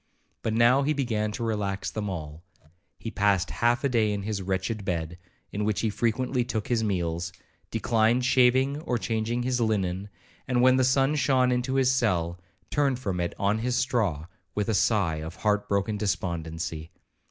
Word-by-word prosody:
But 110 - -1
now 120 +4 +5
he 145 +2 +1
began 110 -7 -1
to 120 - -4
relax 105 -3 -2
them 105 -2 -3
all. 80 -3 -6 0.6
He 115 - -6
passed 100 -3 +1
half 120 +1 +1
the 140 - +2
day 110 -4 +2
in 100 -1 -3
his 105 -1 -3
wretched 95 +3 -2
bed, 85 -2 -3 0.3
in 105 - -2
which 105 -1 0
he 110 - 0
frequently 125 +4 0
took 110 -3 -3
his 115 -2 +1
meals, 85 -4 -1 0.4
declined 115 +2 +2
shaving 130 +3 +3
or 125 -7 -1
changing 115 +1 -1
his 125 -1 0
linen, 100 -3 -1 0.4
and, 125 -1 +2
when 130 0 +6
the 130 - +3
sun 135 +2 +3
shone 130 -4 +2
into 125 +2 0
his 130 -1 +4
cell, 90 -8 0 0.3
turned 140 -3 +2
from 95 -8 -3
it 85 -1 -2
on 100 +2 +1
his 125 +2 -1
straw 110 - 0 0.3
with 105 +1 -1
a - - +2
sigh 95 -5 +2
of 80 +2 -6
heart 105 +1 0
broken 100 +1 0
despondency. 80 -5 -3
110 Hz, 175 wpm, -27 LUFS, 95-125 Hz, 0.6 s, when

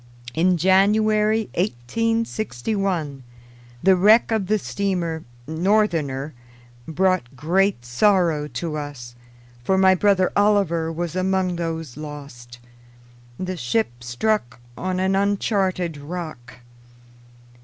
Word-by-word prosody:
In 175 +4 +2
January 210 +4 +3
1861 190 - -2 0.6
the 190 +1 +6
wreck 215 +6 +5
of 215 -4 0
the 215 +2 +2
steamer 180 -6 -2 0.2
Northerner 160 - 0 0.5
brought 180 -6 0
great 175 -1 +1
sorrow 165 - +2
to 155 0 -4
us, 140 -5 -7 0.5
for 190 +8 +2
my 190 0 +6
brother 185 -1 +2
Oliver 195 -6 +2
was 170 +1 -4
among 185 -1 0
those 165 -5 -4
lost. 140 -6 -9 0.8
The 185 0 -3
ship 120 -4 -2
struck 125 - -1 0.2
on 185 +3 -2
an 190 +1 +1
uncharted 195 -4 0
rock. 145 -5 -8
180 Hz, 100 wpm, -22 LUFS, 150-195 Hz, 0.8 s, the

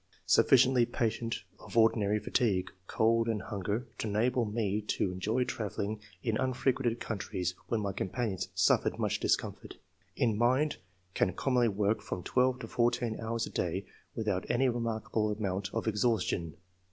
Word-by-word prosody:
Sufliciently 130 -2 +5
patient 115 -1 -1 0.2
of - - -8
ordinary 110 -2 +4
fatigue, 105 -3 0 0.2
cold, 115 +1 +2
and 110 -2 0
hunger, 105 +4 -3
to - - -2
enable 115 +4 +1
me 105 -1 -1
to 95 - 0
enjoy 110 +7 0
travelling 110 -3 -3 0.2
in 115 -4 0
unfrequented 130 -2 0
countries 95 -4 -3
when 115 -2 0
my 100 -1 -2
companions 95 -1 -2
suffered 95 -1 +3
much - - 0
discomfort. - - -1 0.4
In 115 -3 +2
mind 130 +7 +2 0.2
— 90 0 -39
Can 90 - +1
com 135 +7 -1
monly 120 -2 +4
work 105 +1 0
from 90 - -5
twelve 125 +4 +2
to 115 - -6
fourteen 120 -1 0
hours 115 0 -2
a - - -9
day 90 +3 -2 0.3
without 105 -5 -1
any 130 +2 +3
remarkable 115 -2 -1
amount 100 -2 -2
of 115 - -3
exhaustion. 105 - 0
110 Hz, 150 wpm, -31 LUFS, 100-120 Hz, 0.4 s, Sufliciently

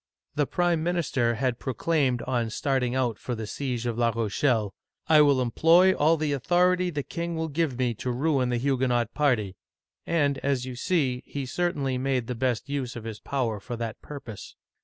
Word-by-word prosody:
The 145 -1 0
prime 175 -2 +1
minister 155 -9 0
had 125 0 -1
proclaimed 130 -1 0
on 120 -3 -1
starting 130 +1 0
out 125 -4 0
for 125 - -4
the 110 -1 -5
siege 125 +1 -3
of 120 -1 -2
La 120 -1 +3
Rochelle, 110 -1 0 0.2
" - - -48
I 155 -1 +7
will 140 -3 +4
employ 165 +9 +5
all 160 +1 +3
the 150 -2 0
authority 180 +6 +2
the 145 -4 -3
king 170 +3 -4
will 160 0 -2
give 150 -4 -1
me 125 -2 +1
to 120 +3 -5
ruin 130 0 +1
the 120 - 0
Huguenot 125 -3 0
party! 110 -11 +1 0.2
" - - -68
— - - -59
and, 145 -5 +1
as 135 -3 -1
you 130 -1 -6
see, 130 -4 0
he 140 -2 -4
certainly 140 -4 -1
made 130 -2 0
the 125 - -3
best 125 -1 -1
use 140 -3 -3
of 115 - -7
his 110 -2 -6
power 120 -6 -2
for 120 +4 -6
that 115 -1 -5
purpose. 135 -8 -9
130 Hz, 200 wpm, -26 LUFS, 120-150 Hz, 0.2 s, I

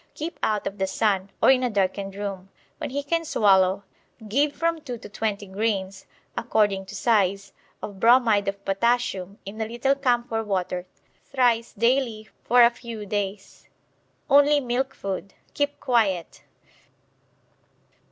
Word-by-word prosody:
Keep 320 +3 -6
out 210 -1 0
of 195 0 -5
the 190 - +1
sun, 195 -1 0
or - - +8
in 260 -1 +3
a 250 - +1
darkened 195 -1 -1
room. 195 -2 -5 0.3
When - - -4
he 285 +2 -3
can 330 +3 0
swallow 195 - +3 0.4
give 285 +7 +2
from 335 -1 -1
2 250 -5 -6
to - - -11
20 210 -1 -3
grains 195 -1 -3 0.3
(according 205 -4 +1
to 205 - -9
size) 200 -2 +1 0.3
of 200 -2 -7
bromide 230 -3 +4
of 200 0 -4
potassium 195 -2 0
in 210 +3 -7
a 220 - -1
little 240 +4 +1
camphor 240 -4 0
water 185 -3 -2 0.4
thrice 245 -4 +1
daily 230 -1 0
for 245 0 +6
a 235 - +6
few 230 -3 -8
days. 200 -1 -5 0.6
Only 290 +1 +5
milk 265 +1 -2
food. 195 0 -5 0.2
Keep 285 0 -1
quiet. 205 - 0
215 Hz, 140 wpm, -24 LUFS, 195-245 Hz, 0.6 s, or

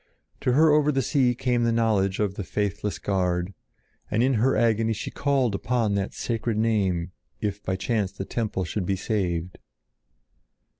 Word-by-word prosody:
To 125 - +1
her 155 +3 +5
over 150 0 +4
the 135 -2 0
sea 125 -2 +2
came 125 -1 0
the 115 - +2
knowledge 105 -4 +1
of 105 -2 0
the 100 - -5
faithless 105 +1 -2
guard, 90 -1 -1 0.6
and 110 +3 +2
in 135 +1 +3
her 130 +2 +3
agony 115 0 +2
she 105 - -5
called 135 -5 +1
upon 110 0 0
that 100 -1 -2
sacred 115 -1 -2
name 95 -6 +1 0.3
if 105 -1 -3
by 95 - -2
chance 100 0 -1
the 95 - -6
temple 105 -5 -2
should 90 +1 -3
be 95 - +1
saved. 90 -4 -2
105 Hz, 165 wpm, -25 LUFS, 95-120 Hz, 0.6 s, her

